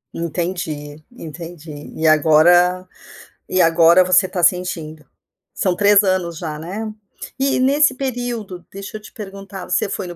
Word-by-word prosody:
Entendi 160 -3 -4
entendi. 160 -2 -9
E 160 - -3
agora 175 +4 +4 0.6
e 185 - +2
agora 165 +2 +5
você 185 +1 +3
está 180 -2 -4
sentindo. 165 -4 -1 0.5
São 185 -2 0
3 205 +1 +5
anos 180 -4 -1
já, 155 -3 -5
né? 205 +7 -6 0.5
E 270 -1 +1
nesse 285 +3 +3
período, 240 -8 -5
deixa 200 +2 -9
eu - - -14
te - - -14
perguntar, 195 -2 -9
você - - 0
foi 195 -3 -4
no 175 - -8
180 Hz, 140 wpm, -19 LUFS, 165-200 Hz, 0.6 s, agora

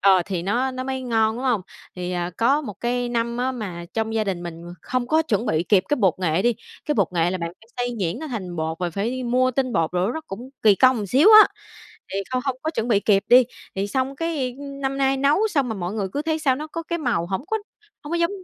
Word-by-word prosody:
ờ, 190 -2 +5
thì 185 -3 -2
nó 245 +8 0
nó 255 0 -5
mới 265 0 -3
ngon, 225 -2 +1
đúng 255 - -5
hông? 245 -6 +2 0.4
Thì, 180 0 -3
à, 175 0 -2
có 270 +6 +3
một 210 -9 -7
cái 245 0 -1
năm 235 0 -1
á 255 +1 0
mà 190 -8 -6
trong 220 0 -1
gia 220 -1 +1
đình 185 -3 -3
mình 170 -1 -7 0.2
không 250 -1 -2
có 315 +2 +3
chuẩn 230 -6 -1
bị 160 -5 +1
kịp 185 +1 +3
cái - - +3
bột 190 - +3
nghệ 180 0 +1
đi. 240 -1 +3 0.3
Cái 300 - 0
bột 200 -7 +2
nghệ 170 0 +2
là 185 - -2
bạn 170 -1 -3
phải 225 - -21
xay 245 0 -1
nhuyễn 185 +5 -1
nó 315 - -6
thành 185 -9 -5
bột 160 +1 -2
và 180 -1 -2
phải 200 +7 -2
đi 255 0 -4
mua 255 +1 +2
tinh 255 0 -1
bột 165 -3 +1
rồi 180 +4 +1
nó 320 - -3
cũng 240 +7 -8
kỳ 210 -2 +6
công 250 -3 +3
xíu 275 - +5
á. - - +2 0.6
Thì 195 - -1
không 255 -1 -1
hông 265 -2 -1
có 315 - -1
chuẩn 245 -7 -2
bị 210 -4 +3
kịp 200 -1 +3
đi. 250 +1 +8 0.3
Thì 195 +1 -1
xong 265 +5 -2
cái, 290 -7 -2
ưm, 280 -1 -8
năm 275 0 -2
nay 270 0 +2
nấu 295 +11 +3
xong 280 -9 +1
mà 220 - -2
mọi 180 0 -4
người 200 -3 -2
cứ 290 - -2
thấy 315 0 -1
sao 275 -4 +2
nó 305 - -5
có 330 +2 -5
cái 340 +1 -3
màu 225 - 0
hổng 190 +7 -3
có 440 - 0 0.5
hông 295 - -7
có - - +2
giống 340 +1 +2
235 Hz, 275 wpm, -23 LUFS, 195-265 Hz, 0.6 s, đi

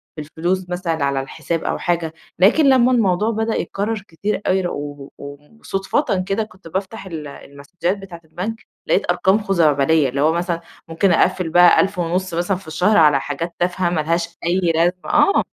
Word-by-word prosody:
في 155 - -6
الفلوس 175 +5 -3
مثلًا 170 -4 -2
على 140 -1 0
الحساب 160 +4 -4
أو - - -1
حاجة، 170 -2 -1 0.3
لكن 275 +10 +5
لمّا 255 -1 +4
الموضوع 210 -3 +2
بدأ 220 +1 -1
يتكرّر 205 0 -3
كتير 195 +5 -3
اوي 185 -1 +1
و 145 -2 -6 0.5
وصدفةً 195 -1 -1
كده 200 +3 0
كنت 190 -5 -14
بافتح 195 +4 -5
ال 160 -5 -7
المسدجات 145 +7 -5
بتاعة 190 -4 -11
البنك، 215 +8 -6 0.2
لقيت 190 - +2
أرقام 190 +3 +2
خزعبلية، 155 -6 +2
اللي 140 +2 -2
هو 155 +2 +4
مثلًا 170 0 -2 0.3
ممكن 170 +4 +1
أقفل 180 0 +2
بقى 175 +2 +6
ألف 195 -1 -2
ونُص 175 +2 -1
مثلًا 175 +3 0
في 185 -3 -15
الشهر 180 +7 +2
على 150 -3 +5
حاجات 165 +5 -5
تافهة 180 0 0
ما 165 -3 0
لهاش 170 +2 -2
أي 180 +2 +1 0.2
لازمة 170 +2 +3 0.2
آه، 300 +6 +4
175 Hz, 175 wpm, -20 LUFS, 160-195 Hz, 0.5 s, بقى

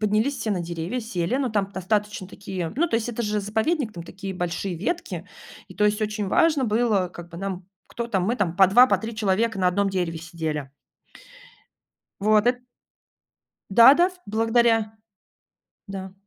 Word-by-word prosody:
поднялись 215 +6 +1
все 220 - -2
на 190 -3 0
деревья, 170 +7 -4
сели, 220 -1 -2
ну, 265 -3 -1
там 200 -2 -1
достаточно 205 +1 -2
такие 190 -3 -6
ну, 340 +3 +2
то - - -2
есть 225 +1 -2
это 235 0 -3
же 210 -1 -1
заповедник, 220 - -1
там 170 - -8
такие 195 +2 -7
большие 175 +1 -3
ветки, 345 - -4 0.4
и - - -12
то 210 - +1
есть, 210 +1 +2
очень 210 -1 -2
важно 300 +5 +3
было 215 -4 +1
как 175 -1 -11
бы, 170 - -10
нам 190 -1 -5 0.2
кто 235 - -5
там, 200 -6 0
мы 235 +6 0
там 175 -6 -1
по 190 -1 +7
2, 245 +7 +7
по - - +3
3 225 +1 -6
человека 215 +1 0
на 185 -1 +3
1 195 +2 +1
дереве 175 -3 -2
сидели. 155 -4 -5 1.5
Вот 215 +2 +3
эт 245 0 +2 1.1
Да-да, 270 - +7
в - - -15
благодаря 225 0 +2 0.9
Да. 190 -2 -7
210 Hz, 175 wpm, -24 LUFS, 185-230 Hz, 1.5 s, по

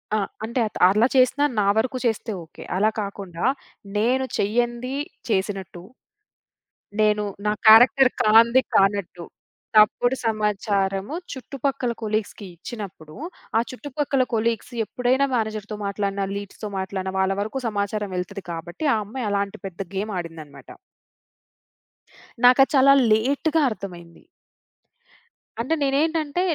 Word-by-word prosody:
ఆ! - - +2 0.3
అంటే 235 +3 -2
అత్ - - -8
అలా 215 +5 +4
చేసినా 265 +3 +4
నా 200 - +2
వరకు 255 +3 0
చేస్తే 225 0 -1
ఓకే. 160 - -13
అలా 210 +3 +3
కాకుండా 195 -4 -5 0.5
నేను 250 +5 +2
చెయ్యంది 240 +4 -1 0.3
చేసినట్టు, 190 -3 -2 1.2
నేను 210 -1 +3 0.2
నా 210 - +3
క్యారెక్టర్ 245 +4 +8
కానిది 230 +4 +6
కానట్టు, 195 -3 +1 0.5
తప్పుడు 220 +4 +5
సమాచారము 205 0 -1 0.2
చుట్టుపక్కల 265 -1 -3
కొలీగ్స్‌కిచ్చినప్పుడు, 200 -5 -5 0.4
ఆ - - +4
చుట్టుపక్కల 275 0 -1
కొలీగ్స్ 230 +2 -1
ఎప్పుడైనా 250 +5 +1
మేనేజర్‌తో 215 -2 -3
మాట్లాడినా, 200 0 -2
లీడ్స్‌తో 205 +1 -7
మాట్లాడినా 190 0 -4
వాళ్ళ 190 0 +2
వరకు 220 +6 -4
సమాచారం 205 -1 -2
వెళ్తది. 180 +2 -5
కాబట్టి 170 - -5
ఆ - - +2
అమ్మాయి 225 +2 -4
అలాంటి 200 0 -2
పెద్ద 185 -2 -10
గేమాడిందనమాట. 165 -9 -6 1.8
నాకది 255 +2 +6
చాలా 275 +1 +7 0.2
లేట్‌గా 280 +8 +2
అర్థమైంది. 175 -5 -9 1.4
అంటే 260 +7 -1
నేనేంటంటే 305 +3 0
215 Hz, 105 wpm, -23 LUFS, 195-250 Hz, 1.8 s, క్యారెక్టర్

